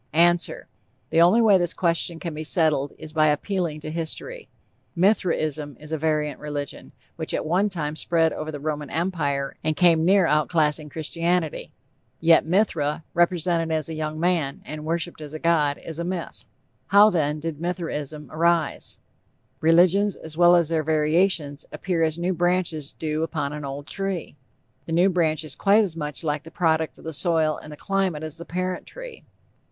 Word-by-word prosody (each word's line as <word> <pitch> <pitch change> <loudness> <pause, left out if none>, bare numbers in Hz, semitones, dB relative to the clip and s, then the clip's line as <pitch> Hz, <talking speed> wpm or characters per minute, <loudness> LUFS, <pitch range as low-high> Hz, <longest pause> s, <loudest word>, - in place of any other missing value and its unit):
_) - - -41
ANSWER: 170 +1 +2 0.4
The 165 - +4
only 200 +8 +5
way 205 -4 +6
this 175 -1 0
question 170 -1 +1
can 170 -1 -5
be 155 +1 -5
settled 155 -3 +1
is 155 - -10
by 155 -1 +4
appealing 155 0 -1
to 155 - -6
history. 170 - -5 0.5
Mithraism 155 - +1
is 150 +1 -11
a 160 - 0
variant 150 -1 -1
religion, 145 -2 -6 0.3
which - - -2
at - - -2
one 185 +6 +2
time 155 -5 -3
spread 165 0 +1
over 155 0 -5
the 145 - -6
Roman 150 -1 -3
Empire 150 -5 -1
and 155 0 0
came 170 -2 +4
near 190 +1 +4
outclassing 150 0 +2
Christianity. 165 +2 -2 0.5
Yet, 165 -1 +4
Mithra, 165 -5 +1
represented 170 -1 +1
as 155 0 0
a - - -4
young 155 0 -4
man, 165 -5 0
and 155 0 -7
worshiped 170 0 -2
as 150 0 -8
a - - -5
god, 155 -4 +2
is 165 -1 -7
a - - -1
myth. 180 0 -5 0.4
How, 205 +2 +7
then, 150 -3 0
did 160 -1 -5
Mithraism 155 -4 -4
arise? 165 -1 0 0.6
Religions, 180 +5 +4
as 160 -1 -8
well 175 +1 +6
as 170 -3 +2
their 165 -1 +1
variations, 155 -1 +1
appear 180 -3 -2
as 160 0 +1
new 175 +2 0
branches 175 -4 0
do 155 -1 -3
upon 155 -3 -2
an 150 0 -6
old 140 +1 -6
tree. 195 -4 -3 0.5
The 165 - -3
new 180 +4 +4
branch 160 -3 +1
is 155 -3 -5
quite 210 +2 +4
as 180 -6 -3
much 150 0 -5
the 150 0 -2
product 160 -2 0
of - - -16
the 160 - -5
soil 160 -1 +2
and 150 -1 -10
climate 190 -5 -1
as 155 0 -6
the 170 - -8
parent 185 +1 -3
tree. - - -10
160 Hz, 175 wpm, -24 LUFS, 155-175 Hz, 0.6 s, How